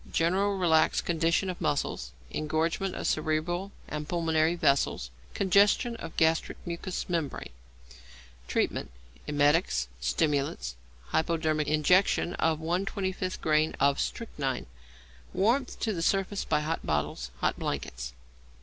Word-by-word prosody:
General 195 +4 +2
relaxed 160 -4 +3
condition 170 +3 +1
of 180 -1 -4
muscles; 65 - -1 0.2
engorgement 165 - -1
of - - -4
cerebral 160 +5 0 0.2
and 150 0 -5
pulmonary 165 -1 +2
vessels. 140 - +1 0.2
Congestion 200 +5 +3
of 165 -6 -8
gastric 160 0 +2
mucous 175 +2 -4
membrane. 165 - -2 1.0
Treatment. - - 0 0.4
Emetics, 145 - +2
stimulants, 70 - 0 0.3
hypodermic 160 -2 +1
injection 175 +4 +3
of 160 -1 +2
1/25 185 +3 -2
grain 155 0 +2
of 140 0 +3
strychnine. 140 - -2 0.7
Warmth 245 +7 +1
to 220 - 0
the 170 - -3
surface 195 +3 0
by 150 -1 +1
hot 160 +2 -2
bottles, 75 -4 -1
hot - - 0
blankets. 60 0 -4
160 Hz, 115 wpm, -29 LUFS, 150-185 Hz, 1.0 s, relaxed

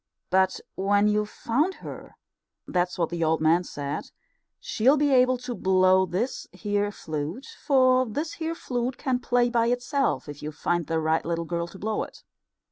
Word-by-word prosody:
But 190 0 +3
when 205 +2 +2
you've 210 0 +1
found 295 - 0
her - - -10 0.5
that's 180 0 0
what 170 -2 0
the 170 -1 -2
old 160 0 +2
man 160 +3 +3
said 145 -4 -5 0.5
she'll 260 +7 +2
be 290 -1 +2
able 255 0 +4
to 245 0 -5
blow 185 -2 +3
this 195 +9 -2
here 205 -1 -1
flute, 160 - -5 0.2
for 255 -2 +4
this 295 +9 -3
here 325 +1 -1
flute 245 -3 -3
can 255 -2 0
play 245 0 +2
by 230 -1 +2
itself 245 - 0
if 145 -1 -8
you 150 - -4
find 170 +2 -1
the 165 0 0
right 160 0 +1
little 170 0 -2
girl 170 0 -2
to 175 - -12
blow 215 +2 -2
it. - - -8
205 Hz, 175 wpm, -26 LUFS, 170-250 Hz, 0.5 s, able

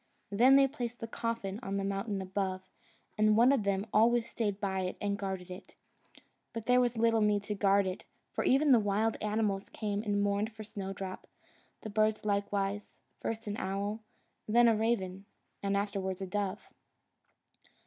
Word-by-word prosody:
Then 245 +7 +6
they 275 0 +6
placed 245 -4 -5
the 230 - -4
coffin 225 -4 -3
on 195 -5 -3
the 195 - -1
mountain 195 0 -2
above, 190 0 -2 0.6
and 215 0 +4
one 240 +3 +6
of 275 -4 +3
them 200 0 0
always 235 +2 +4
stayed 205 -4 -2
by 190 -2 -1
it 185 -1 -3
and 200 -1 -1
guarded 190 -2 -5
it. 180 +2 -10 0.8
But 230 -1 -5
there 250 0 +5
was 240 -1 0
little 225 0 +3
need 210 -1 +2
to 210 - -3
guard 200 0 +3
it, 185 0 -4 0.3
for - - -2
even 280 +2 +4
the 245 - +7
wild 210 +2 +1
animals 210 -2 -1
came 205 -1 -2
and 205 -2 0
mourned 205 +2 0
for 220 0 -8
Snowdrop: 195 -3 -6 0.5
the 215 - -7
birds 215 0 +1
likewise 200 0 -1 0.2
first 225 0 -4
an 205 0 -3
owl, 200 +2 -2 0.5
and 215 - -2
then 240 0 +7
a 225 - +5
raven, 200 -4 -1 0.4
and 200 0 0
afterwards 195 -2 -2
a 195 - -3
dove. 195 0 -3
205 Hz, 175 wpm, -31 LUFS, 195-225 Hz, 0.8 s, the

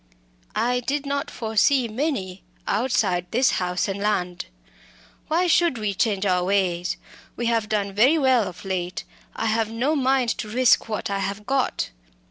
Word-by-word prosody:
"I 250 +1 +1
did 275 +3 -2
not 280 +2 -2
foresee 235 +3 +2
many, 215 - -3 0.2
outside 200 -6 0
this 255 +3 +3
house 180 +2 -1
and 195 0 -3
land. 180 -4 -1 0.8
Why 340 +4 +2
should 340 -5 +3
we 210 -2 -1
change 200 -1 0
our 180 -2 +2
ways? 180 -2 0 0.4
We 240 - -3
have 230 -2 +1
done 200 -2 -1
very 250 +11 +4
well 260 -7 +3
of 180 +1 -10
late. 180 -1 -3 0.3
I 225 - -2
have 220 0 +1
no 250 +7 0
mind 260 -3 +2
to 215 - -4
risk 245 0 +3
what 215 -2 -3
I 200 - -1
have 200 +2 -4
got." 265 - 0
220 Hz, 160 wpm, -24 LUFS, 195-260 Hz, 0.8 s, very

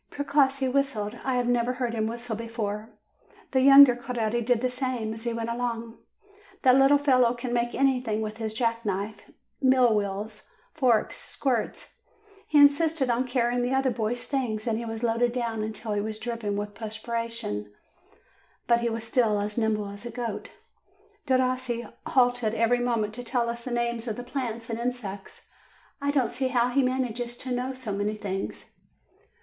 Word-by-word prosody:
Precossi 275 -2 +1
whistled; 245 -5 -1
I 260 -1 0
had 245 -1 +1
never 245 0 +2
heard 250 -2 -2
him 220 -1 0
whistle 235 0 -4
before. 220 -1 -4 0.6
The 260 - +3
younger 275 -1 +9
Coretti 240 -2 -2
did 240 0 +2
the 255 - +2
same, 250 -4 -2
as 225 +1 -9
he 235 - 0
went 230 0 -3
along. 235 -1 -3 0.6
That 255 -1 +6
little 275 +2 +6
fellow 255 -4 +3
can 240 0 -4
make 240 0 0
everything 250 -5 +1
with 215 0 -5
his 220 -1 -4
jack 230 0 0
knife, 200 +1 -4 0.3
mill 255 -3 +5
wheels, 210 +1 -3 0.2
forks, 250 -7 +2
squirts. 250 -5 -3 0.5
He 300 - +2
in 285 0 +10
sisted 285 -3 0
on 250 +2 -1
carrying 245 -1 +1
the 250 +2 0
other 265 -1 +2
boys' 230 +1 -2
things, 235 -6 -2
and 225 -2 0
he 235 - -5
was 225 0 -5
loaded 235 +1 +2
down 230 -3 -2
until 215 0 -4
he 205 - 0
was 215 +1 -4
dripping 220 -3 -3
with 205 0 -4
perspiration 230 - -4
1, 105 - -22 0.9
but 235 -1 +4
he 235 0 0
was 225 0 -3
still 225 -3 +2
as 205 +1 -2
nimble 220 -3 0
as 200 +1 -9
a 240 - -5
goat. 230 -3 -4 0.8
Derossi 255 -2 +1 0.2
halted 245 -3 +2
every 230 +2 +2
moment 230 -4 0
to 245 +2 -6
tell 240 -1 0
us 235 0 -5
the 255 - -4
names 235 0 -1
of 220 - -2
the 245 - -6
plants 240 -3 -4
and 230 0 -4
insects. 235 -5 -5 0.5
I 280 - 0
don't 265 -5 +1
see 265 - -1
how 245 -1 +2
he 275 +3 +2
manages 245 -2 -1
to 255 0 -4
know 255 +2 -2
so 255 -5 -5
many 205 +2 -1
things. 195 -2 -5
235 Hz, 180 wpm, -27 LUFS, 220-255 Hz, 0.9 s, in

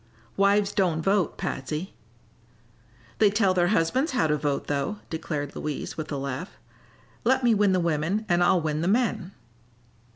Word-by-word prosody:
"Wives 200 0 +3
don't 175 -6 0
vote, 195 -2 +1
Patsy." 150 +7 -4 1.3
"They 210 - +6
tell 200 -2 +2
their 175 -1 +2
husbands 220 - +1
how 250 - +2
to 150 -1 +2
vote, 145 -1 -2
though," 145 +8 -2
declared 155 -3 -4
Louise, 150 -1 -4
with 155 -1 -6
a 145 - -2
laugh. 140 +6 -5 0.7
"Let 260 +2 +2
me 240 -2 +4
win 205 -2 +3
the 185 - +2
women 170 +5 0
and 175 0 +3
I'll 175 +1 +4
win 155 -1 -1
the 170 - -1
men." 215 -3 0
175 Hz, 160 wpm, -26 LUFS, 155-205 Hz, 1.3 s, They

